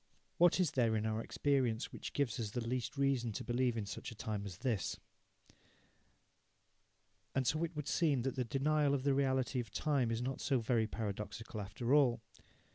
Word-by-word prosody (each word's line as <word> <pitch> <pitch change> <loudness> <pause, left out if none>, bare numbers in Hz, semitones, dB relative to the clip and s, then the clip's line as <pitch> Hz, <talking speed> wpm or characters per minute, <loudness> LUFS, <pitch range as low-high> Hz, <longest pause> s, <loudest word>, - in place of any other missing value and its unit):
What 175 +1 +6
is 180 -6 +3
there 115 -4 +2
in 110 0 0
our 110 0 0
experience 130 -4 0
which - - -6
gives 135 -7 0
us 110 -3 -2
the 115 +2 -3
least 125 +2 -2
reason 135 -4 +1
to - - -4
believe 120 -1 +1
in 110 - -2
such - - -6
a - - -9
time 105 -1 -3
as 90 -3 -8
this? 110 - -1 2.4
And 130 - +2
so 155 +6 +1
it 170 0 -3
would 150 -1 -4
seem 145 -8 +2
that 135 - -1
the 130 - 0
denial 140 +3 +2
of 130 - -2
the 140 0 +3
reality 130 -1 +1
of 115 -3 -4
time 135 +2 +1
is 115 0 -1
not 130 +1 -3
so 135 - +2
very 115 -1 +1
paradoxical 110 +1 -4
after 120 +6 -2
all. 135 -6 +5
125 Hz, 190 wpm, -35 LUFS, 110-140 Hz, 2.4 s, What